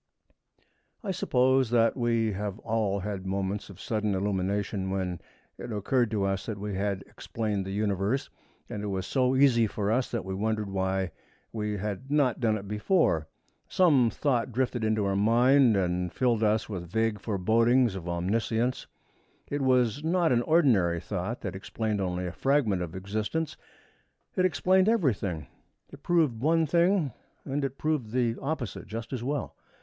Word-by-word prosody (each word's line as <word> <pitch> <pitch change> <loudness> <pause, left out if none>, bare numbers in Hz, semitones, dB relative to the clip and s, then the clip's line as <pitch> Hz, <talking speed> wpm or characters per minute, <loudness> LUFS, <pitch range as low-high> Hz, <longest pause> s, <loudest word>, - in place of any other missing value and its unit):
I 200 - -2
suppose 130 -7 +2
that 115 -1 +3
we 115 -3 +1
have 100 0 -4
all 110 -3 0
had 100 -1 -4
moments 100 +1 -2
of 95 -2 -12
sudden 105 -2 -1
illumination 95 0 -1
when 95 -2 -2 0.4
it - - -6
occurred 115 +3 +1
to 105 -2 -1
us 95 0 -1
that 110 -3 -3
we 105 0 -4
had 100 0 -2
explained 105 -4 -4
the - - -4
Universe, 100 +4 -1 0.4
and 105 - -5
it 105 - -3
was 95 -2 -2
so 130 +2 +1
easy 130 -4 +4
for 105 0 -2
us 125 +3 +1
that 115 -5 -3
we 95 - -4
wondered 105 0 -1
why 95 -1 -1 0.4
we 105 -2 -2
had 105 +6 -5
not 140 -5 +2
done 110 -3 +2
it 100 -1 -8
before. 105 - +1 0.4
Some 145 -10 +4
thought 125 -1 0
drifted 120 -1 -1
into 110 -1 +1
our 100 0 0
mind 120 +3 +4
and 90 -1 0
filled 120 -4 +1
us 110 0 +2
with 90 -5 -6
vague 110 +2 0
forebodings 115 +4 +2
of 90 -2 -6
omniscience. 110 +7 -1 0.6
It 145 0 -1
was 130 0 +2
not 170 +1 +2
an 120 -1 +3
ordinary 120 - +3
thought, 90 +7 -4
that 95 -3 -4
explained 105 +1 -2
only 90 -1 -2
a 90 - -3
fragment 130 -7 +1
of 85 -1 -5
existence. 105 +11 -3 0.8
It 185 - +3
explained 185 +2 +3
everything. 105 - 0 0.5
It 140 - -12
proved 155 -10 +2
one 160 +3 +3
thing 170 - +2 0.3
and 145 +1 -2
it 135 0 -3
proved 150 -8 -1
the 120 -2 +1
opposite 135 -8 -4
just 115 +3 -6
as 120 -2 -3
well. 140 +1 -3
110 Hz, 165 wpm, -28 LUFS, 100-130 Hz, 0.8 s, easy